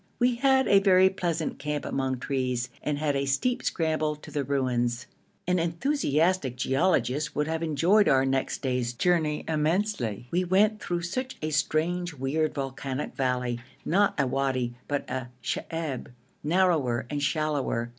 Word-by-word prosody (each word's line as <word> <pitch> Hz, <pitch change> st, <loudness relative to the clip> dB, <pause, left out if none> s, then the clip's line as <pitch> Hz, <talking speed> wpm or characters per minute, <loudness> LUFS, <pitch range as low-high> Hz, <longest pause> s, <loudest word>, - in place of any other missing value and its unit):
We 245 Hz, 0 st, +3 dB
had 265 Hz, 0 st, +3 dB
a 200 Hz, -, +6 dB
very 190 Hz, -1 st, +5 dB
pleasant 170 Hz, -4 st, -2 dB
camp 150 Hz, +1 st, -3 dB
among 130 Hz, -1 st, -1 dB
trees, 125 Hz, -2 st, -1 dB
and 150 Hz, -1 st, -1 dB
had 145 Hz, -1 st, 0 dB
a 140 Hz, 0 st, 0 dB
steep 240 Hz, -, +1 dB
scramble 155 Hz, -2 st, 0 dB
to 150 Hz, -, -13 dB
the 145 Hz, -2 st, -1 dB
ruins. 125 Hz, -3 st, 0 dB, 0.4 s
An 180 Hz, 0 st, +2 dB
enthusiastic 170 Hz, -, +1 dB
geologist 135 Hz, +1 st, +1 dB
would 150 Hz, +1 st, 0 dB
have 160 Hz, 0 st, -2 dB
enjoyed 170 Hz, +6 st, +3 dB
our 135 Hz, -1 st, +4 dB
next 135 Hz, +2 st, -1 dB
day's 125 Hz, -2 st, -1 dB
journey 155 Hz, +1 st, +1 dB
immensely; 155 Hz, -, 0 dB
we 180 Hz, +2 st, +2 dB
went 205 Hz, +4 st, +3 dB
through 175 Hz, -1 st, -2 dB
such 255 Hz, +9 st, -3 dB
a 155 Hz, -, -1 dB
strange 160 Hz, +3 st, 0 dB
weird 145 Hz, +4 st, -1 dB
volcanic 135 Hz, 0 st, -4 dB
valley 125 Hz, -2 st, -1 dB, 0.3 s
not 200 Hz, +1 st, +2 dB
a 140 Hz, -, +3 dB
wadi, 130 Hz, -2 st, -1 dB
but 145 Hz, -1 st, -2 dB
a 130 Hz, -2 st, -4 dB
sheb, 160 Hz, -6 st, -3 dB, 0.4 s
narrower 155 Hz, -8 st, +2 dB
and 145 Hz, -1 st, -2 dB
shallower. 140 Hz, -5 st, 0 dB
150 Hz, 150 wpm, -27 LUFS, 130-175 Hz, 0.4 s, a